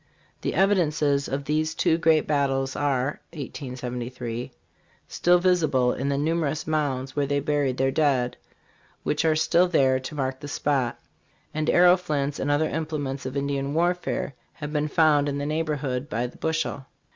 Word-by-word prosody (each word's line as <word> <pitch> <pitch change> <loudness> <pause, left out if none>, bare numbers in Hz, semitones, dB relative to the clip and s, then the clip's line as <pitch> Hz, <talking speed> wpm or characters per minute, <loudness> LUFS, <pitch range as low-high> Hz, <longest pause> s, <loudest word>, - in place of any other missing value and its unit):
The - - -2
evidences 155 -7 +2
of 140 +1 -3
these 155 +2 0
two 165 - +2
great 160 -1 +3
battles 135 -2 0
are. 140 -1 0
(1873) 125 -4 -5 0.6
still 175 0 +3
visible 155 -9 +2
in 135 +2 -2
the 140 - 0
numerous 155 -1 0
mounds 135 -4 -1
where 145 -1 +1
they 145 0 +1
buried 140 -3 0
their 135 0 +2
dead, 135 -5 +1 0.7
which - - 0
are 160 -1 +3
still 170 +3 +3
there 135 -6 +3
to 130 +4 -7
mark 130 -2 -2
the 145 - -7
spot; 140 -4 -1 0.5
and 155 0 -1
arrow 180 +1 +6
flints 145 -5 -2
and 140 - -1
other 145 +2 +2
implements 145 -4 -3
of 130 +2 -4
Indian 140 0 -2
warfare 175 -3 0 0.2
have 150 -1 -7
been 150 0 +1
found 150 -1 +3
in 140 - -2
the 145 - -2
neighborhood 150 -4 -2
by 115 +3 -1
the 125 - -8
bushel. 160 -4 -2
145 Hz, 160 wpm, -25 LUFS, 135-155 Hz, 0.7 s, arrow